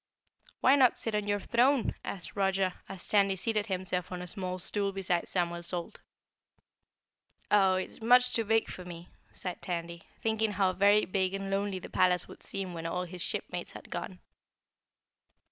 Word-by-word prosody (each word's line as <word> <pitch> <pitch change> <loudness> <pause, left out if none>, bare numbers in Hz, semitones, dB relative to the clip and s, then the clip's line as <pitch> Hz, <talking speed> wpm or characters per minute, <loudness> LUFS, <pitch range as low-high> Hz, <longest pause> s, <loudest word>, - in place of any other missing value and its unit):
"Why 265 - +6
not 260 -4 +5
sit 225 - -2
on 210 -1 -1
your 205 0 +1
throne?" 245 +4 +2
asked 180 - -6
Roger 195 -2 +1 0.2
as 190 -2 -5
Tandy 200 -2 +3
seated 210 +2 0
himself 185 -2 -2
on 180 - -4
a - - -5
small 185 0 -4
stool 200 +2 -1
beside 185 -3 -1
Samuel 170 -1 -1
Salt. 170 0 -3 1.5
"Oh, 195 -2 +5
it's 185 +4 -4
much 250 +2 +5
too 230 - +2
big 225 +1 +2
for 180 - -7
me," 175 -1 -9 0.2
sighed 180 -2 -6
Tandy, 170 -1 -4 0.2
thinking 220 -1 0
how 190 -1 +2
very 200 +3 +4
big 190 0 0
and 195 0 -4
lonely 200 0 0
the 185 - -7
palace 180 -1 +2
would - - -13
seem 195 -2 -2
when 165 -1 -4
all 180 +2 -2
his 180 0 -5
shipmates - - -3
had - - -11
gone. - - -5
190 Hz, 170 wpm, -30 LUFS, 180-210 Hz, 1.5 s, Why